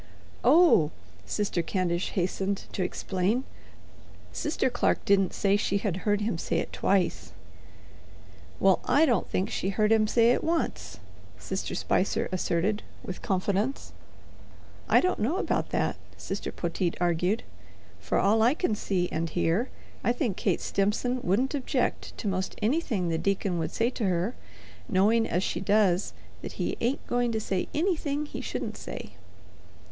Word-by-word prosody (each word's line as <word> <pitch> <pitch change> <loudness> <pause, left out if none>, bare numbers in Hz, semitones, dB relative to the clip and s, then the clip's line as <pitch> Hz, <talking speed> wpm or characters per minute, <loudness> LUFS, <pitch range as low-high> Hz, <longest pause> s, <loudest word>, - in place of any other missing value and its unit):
"Oh," 315 - +6 0.4
Sister 205 -4 0
Candish 175 0 -1
hastened 190 +2 -1
to - - -3
explain, 190 +6 0 0.9
"Sister 300 -3 0
Clark 245 -1 0
didn't 195 -2 +3
say 200 0 +2
she 200 -1 +1
had 195 -3 -1
heard 205 +1 0
him 205 -6 -1
say 165 - -1
it - - -3
twice.'" 190 -3 0 1.3
"Well, - - +4
I 310 +3 +5
don't 245 -6 +1
think 190 +3 -1
she 190 - -1
heard 210 +2 +1
him 220 -1 +4
say 230 +1 +4
it - - +1
once," 330 0 -2 0.4
Sister - - -4
Spicer - - +1
asserted 185 +3 0 0.2
with 185 - -6
confidence. 200 +7 -1 1.0
"I - - +6
don't 365 - 0
know 270 - +1
about - - -1
that," - - 0 0.2
Sister - - -4
Poteet 170 0 -2
argued. 180 +6 +1 0.6
"From - - 0
all 220 +3 +4
I 240 +6 +4
can 325 -10 0
see 190 -3 0
and 165 +1 -1
hear 175 +9 +1 0.3
I 240 - +2
think 245 - -1
Kate - - 0
Stimson 230 +6 0
wouldn't 240 - +1
object 275 -3 -1
to 215 - -4
'most 190 -1 -2
anything 220 - 0
the 165 -1 0
deacon 195 -3 0
would 165 - -1
say 235 +2 +1
to 235 - -2
her, 185 +4 0 0.6
knowing 220 +4 +3
as 180 +3 0
she - - -1
does 200 -2 +2 0.3
that - - -6
he - - -2
ain't 245 +4 0
going 245 -1 0
to 220 - 0
say 195 -4 -2
anything 300 -3 0
he - - -6
shouldn't - - -4
say." - - -7
205 Hz, 150 wpm, -28 LUFS, 185-240 Hz, 1.3 s, Oh